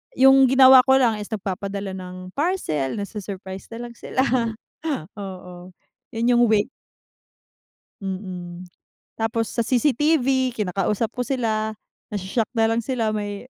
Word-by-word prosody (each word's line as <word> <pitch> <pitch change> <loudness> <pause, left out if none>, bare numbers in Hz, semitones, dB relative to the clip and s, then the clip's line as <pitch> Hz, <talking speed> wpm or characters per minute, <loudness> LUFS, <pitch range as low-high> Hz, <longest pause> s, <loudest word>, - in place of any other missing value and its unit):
yung 270 +1 +7
ginawa 260 0 +8
ko 265 0 +4
lang 230 -4 +2
is 205 - -6
nagpapadala 200 -1 -4
ng 185 0 -8
parcel, 275 - -1
nasu-surprise 195 -2 -7
na 230 - -7
lang 240 - -12
sila. 260 - -2 1.0
Oo. 180 -2 -9 0.4
Yun 235 +1 +1
yung 240 - +5
way 210 -1 +3 1.3
Mm. 185 -2 -6 0.5
Tapos 225 0 -1
sa 235 - -1
CCTV 260 0 +2
kinakausap 205 +2 -1
ko 250 0 -3
sila, 220 -4 -1 0.4
nasho-shock 205 +3 -1
na 225 - +3
lang 225 - +1
sila 230 -2 -1
may 205 +3 -5
215 Hz, 125 wpm, -23 LUFS, 190-250 Hz, 1.3 s, ginawa